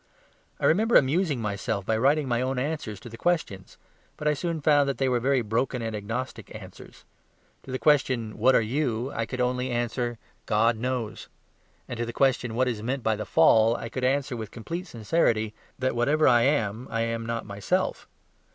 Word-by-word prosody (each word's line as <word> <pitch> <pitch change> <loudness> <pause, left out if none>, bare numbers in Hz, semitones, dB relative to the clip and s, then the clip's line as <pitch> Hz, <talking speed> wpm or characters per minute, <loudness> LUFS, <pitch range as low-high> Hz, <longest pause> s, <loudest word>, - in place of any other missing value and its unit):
I - - -1
remember 220 +8 +3
amusing 145 +1 +3
myself 100 -2 -2
by 110 - +1
writing 140 +5 +2
my 120 -1 0
own 130 +1 -1
answers 130 -7 -3
to - - -10
the 115 -1 -10
questions; 160 - -2 0.4
but 150 - -3
I 150 - +4
soon 165 +2 -3
found 145 -1 +3
that 135 - -2
they 135 - +1
were 125 -1 +2
very 130 0 +1
broken 115 +3 -1
and 110 -1 -3
agnostic 110 +5 -5
answers. - - -12 0.6
To 130 - -10
the 130 - -1
question, 130 -7 +2
"What 130 - +5
are - - +5
you?" 125 0 -1
I 115 - -2
could 125 - -5
only 125 +1 0
answer, 120 0 -2 0.3
"God 115 +2 +3
knows." 120 -1 -3 0.6
And 120 - -6
to 120 - 0
the 120 - -5
question, 125 -4 +1
"What 130 +2 +2
is 115 -4 -2
meant 125 +3 -3
by 110 -1 +2
the 105 0 -5
Fall?" 115 +3 +5
I 115 - -5
could 130 - -5
answer 135 0 +1
with 110 -3 -6
complete 170 - -6
sincerity, 110 -4 0 0.2
"That 130 -2 -1
whatever 145 +6 +3
I 120 -2 +5
am, 120 -4 0
I 115 0 -1
am 115 0 -2
not 115 0 -3
myself." 100 -1 -2
125 Hz, 195 wpm, -26 LUFS, 115-135 Hz, 0.6 s, What